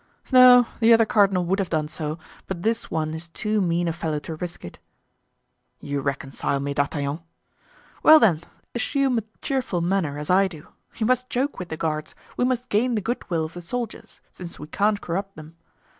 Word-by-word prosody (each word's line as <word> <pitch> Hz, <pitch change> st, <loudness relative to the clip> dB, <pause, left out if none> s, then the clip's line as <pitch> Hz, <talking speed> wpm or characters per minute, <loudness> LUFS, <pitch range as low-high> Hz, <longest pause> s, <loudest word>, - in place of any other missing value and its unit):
"No, 250 Hz, -1 st, +8 dB
the 230 Hz, 0 st, +5 dB
other 225 Hz, 0 st, +5 dB
cardinal 195 Hz, -4 st, +3 dB
would 190 Hz, +3 st, 0 dB
have 195 Hz, -, -1 dB
done 155 Hz, -2 st, 0 dB
so, 155 Hz, 0 st, -5 dB, 0.3 s
but 175 Hz, -2 st, -5 dB
this 225 Hz, +1 st, 0 dB
one 155 Hz, -1 st, -2 dB
is 160 Hz, +1 st, -6 dB
too 210 Hz, +5 st, -1 dB
mean 175 Hz, -1 st, 0 dB
a 165 Hz, -, 0 dB
fellow 160 Hz, -2 st, -2 dB
to 165 Hz, -, -6 dB
risk 175 Hz, -, -6 dB
it." 85 Hz, -, -10 dB, 1.0 s
"You 145 Hz, -1 st, -3 dB
reconcile 140 Hz, 0 st, -2 dB
me, 140 Hz, +1 st, -3 dB
D'Artagnan." 140 Hz, +1 st, -1 dB, 0.8 s
"Well, 315 Hz, 0 st, +8 dB
then, 175 Hz, -, +3 dB, 0.3 s
assume 265 Hz, 0 st, +1 dB
a -, -, -8 dB, 0.2 s
cheerful 260 Hz, -, -1 dB
manner, 170 Hz, -5 st, 0 dB
as 150 Hz, +3 st, -3 dB
I 195 Hz, +1 st, +5 dB
do; 165 Hz, -4 st, -12 dB, 0.3 s
we 220 Hz, -, +1 dB
must 255 Hz, +1 st, +1 dB
joke 265 Hz, +1 st, -1 dB
with 180 Hz, -, -6 dB
the 160 Hz, -, -5 dB
guards, 155 Hz, -1 st, -3 dB, 0.2 s
we -, -, 0 dB
must 250 Hz, -1 st, -1 dB
gain 235 Hz, +4 st, +1 dB
the 215 Hz, -, 0 dB
good 235 Hz, +4 st, -4 dB
will 165 Hz, -3 st, 0 dB
of 155 Hz, -, -9 dB
the 175 Hz, -, -8 dB
soldiers, 235 Hz, +6 st, -6 dB
since 175 Hz, -2 st, -9 dB
we 150 Hz, -, -8 dB
can't 205 Hz, +6 st, 0 dB
corrupt 195 Hz, +3 st, -4 dB
them. 155 Hz, +1 st, -12 dB
180 Hz, 195 wpm, -24 LUFS, 155-225 Hz, 1.0 s, No